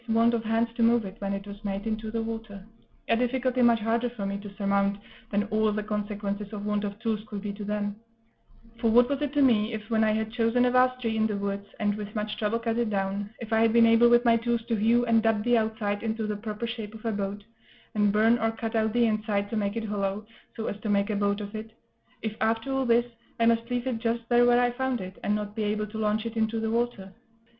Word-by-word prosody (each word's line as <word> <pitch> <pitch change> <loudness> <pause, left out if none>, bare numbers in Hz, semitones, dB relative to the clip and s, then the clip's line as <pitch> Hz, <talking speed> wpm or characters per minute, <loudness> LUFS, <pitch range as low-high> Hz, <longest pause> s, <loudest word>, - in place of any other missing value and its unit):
want 230 +1 +4
of 230 -1 0
hands 225 +1 +1
to 235 - -2
move 230 -1 +4
it, 190 0 -7
when 200 -1 -3
it 195 0 -4
was 205 +1 -10
made, 200 0 -3
into 220 0 -3
the 225 +1 -2
water 225 -3 -6 0.4
a - - +3
difficulty 250 +1 0
much 235 -1 +5
harder 230 +2 0
for 225 -4 -6
me 200 0 -2
to 205 0 -9
surmount 200 -1 +1 0.3
than 205 0 +1
all 215 0 +2
the 210 0 -2
consequences 205 -1 -3
of 205 -1 -5
want 210 0 0
of 200 0 -4
tools 220 -2 0
could 205 - -5
be 205 0 -4
to 205 +1 -7
them; 205 0 -2 0.8
for 230 -1 +2
what 240 +2 +6
was 280 +1 -2
it 290 -2 -1
to 290 -1 +3
me 225 -3 +3
if, 215 -1 -5
when 220 -1 +3
I 215 - +3
had 220 0 -2
chosen 240 +1 +2
a 250 - +2
vast 255 0 +3
tree 225 -2 -1
in 220 0 +3
the 210 -2 -2
woods, 200 0 -3
and 205 -1 +1
with 210 0 -7
much 210 0 -2
trouble 215 +1 0
cut 230 0 -1
it 235 -2 +1
down, 200 0 -2
if 225 -1 -5
I 220 - +4
had 225 0 +4
been 235 0 +6
able 230 +1 +6
with 240 +1 +5
my 230 -1 +5
tools 235 0 -1
to 230 - +2
hew 230 +3 +3
and 230 -1 +4
dub 220 -1 +1
the 240 +1 +3
outside 220 -2 -2
into 220 -1 -2
the 210 0 -2
proper 210 +2 -5
shape 225 -2 -6
of 220 - -12
a 225 - +1
boat, 200 0 -3 0.5
and 210 -1 +3
burn 225 +3 +4
or 225 - +1
cut 225 0 -4
out 220 -1 +1
the 240 0 +4
inside 215 -2 -1
to - - -2
make 205 -1 -1
it 225 -1 -2
hollow, 205 0 -2 0.3
so 225 - -4
as 205 - -4
to 215 - -3
make 200 +1 +2
a - - -1
boat 200 0 0
of 205 0 -7
it 220 0 -7 0.5
if, 220 -1 -2
after 225 +4 0
all 270 -1 0
this, 235 0 +4 0.3
I 230 - +4
must 230 +1 +2
leave 245 0 -1
it 250 -3 -1
just 230 0 -1
there 240 0 +5
where 240 0 +5
I 245 0 +3
found 260 0 -1
it, 185 0 -8
and 205 - +1
not 210 0 -4
be 220 - -2
able 210 +1 -1
to 215 +1 -7
launch 215 +1 0
it 230 0 -5
into 225 0 0
the 220 0 -1
water? 230 -5 -2
220 Hz, 265 wpm, -27 LUFS, 205-230 Hz, 0.8 s, what